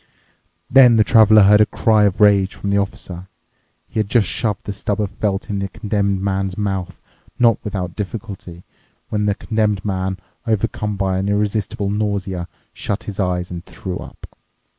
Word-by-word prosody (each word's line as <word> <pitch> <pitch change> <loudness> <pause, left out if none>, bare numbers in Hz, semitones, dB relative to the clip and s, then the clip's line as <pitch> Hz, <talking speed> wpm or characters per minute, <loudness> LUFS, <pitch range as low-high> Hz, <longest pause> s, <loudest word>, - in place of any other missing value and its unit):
Then 125 -2 +7
the 110 - +5
Traveler 110 -2 +6
heard 105 +2 +6
a - - +6
cry 110 -1 +3
of 100 -2 0
rage 100 -2 +4
from 100 - -3
the 100 - +3
Officer. 95 -2 -5 0.6
He - - -4
had 105 -2 -1
just 115 -3 +3
shoved 105 -4 -2
the 100 - -4
stub 105 +1 -3
of 105 -2 -1
felt 100 -1 -2
in 100 -1 -2
the 100 - -2
Condemned 100 -2 -1
Man's 95 -1 -1
mouth, 95 -3 -3 0.4
not 115 -3 +4
without 90 -4 -4
difficulty, 100 -4 -7 0.5
when 105 -1 0
the 100 - +1
Condemned 105 -4 -1
Man, 95 -1 -2 0.3
overcome 105 -1 -1
by 95 -1 0
an 100 +1 -1
irresistible 105 -1 -1
nausea, 100 -4 -2 0.3
shut 100 - -4
his 105 -1 -7
eyes 90 -2 -1
and 85 -1 -6
threw 90 -1 -6
up. - - -11
100 Hz, 170 wpm, -19 LUFS, 95-105 Hz, 0.6 s, Then